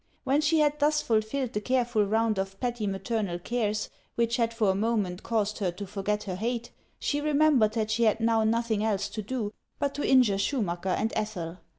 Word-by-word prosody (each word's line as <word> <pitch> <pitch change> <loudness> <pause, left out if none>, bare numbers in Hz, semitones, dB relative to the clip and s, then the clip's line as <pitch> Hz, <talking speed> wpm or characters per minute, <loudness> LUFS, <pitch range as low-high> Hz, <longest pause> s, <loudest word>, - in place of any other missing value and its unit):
When 275 +2 +2
she 310 +2 +3
had 300 0 +2
thus 300 +1 +3
fulfilled 225 +3 0
the 210 - -1
careful 240 -2 +1
round 220 0 +1
of 195 0 -4
petty 240 -4 -2
maternal 195 -1 -2
cares 210 +1 -1 0.3
which 235 +1 +1
had 230 -1 +1
for 220 -4 +2
n 190 - -2
moment 210 -4 0
caused 215 -2 -1
her 195 -3 +1
to 200 +3 -6
forget 205 +1 -2
her 190 - -4
hate, 235 +3 -3 0.3
she 290 0 -1
remembered 290 -7 +3
that 220 -2 -1
she 230 +2 +2
had 220 +1 +3
now 225 -1 +2
nothing 225 -1 +1
else 205 -2 0
to 215 +1 -5
do 215 -1 -3 0.2
but 280 -1 -1
to 290 - -3
injure 240 -7 +5
Schumacker 190 -7 -1
and 220 - -1
Ethel. 180 -5 -3
220 Hz, 200 wpm, -28 LUFS, 205-240 Hz, 0.3 s, injure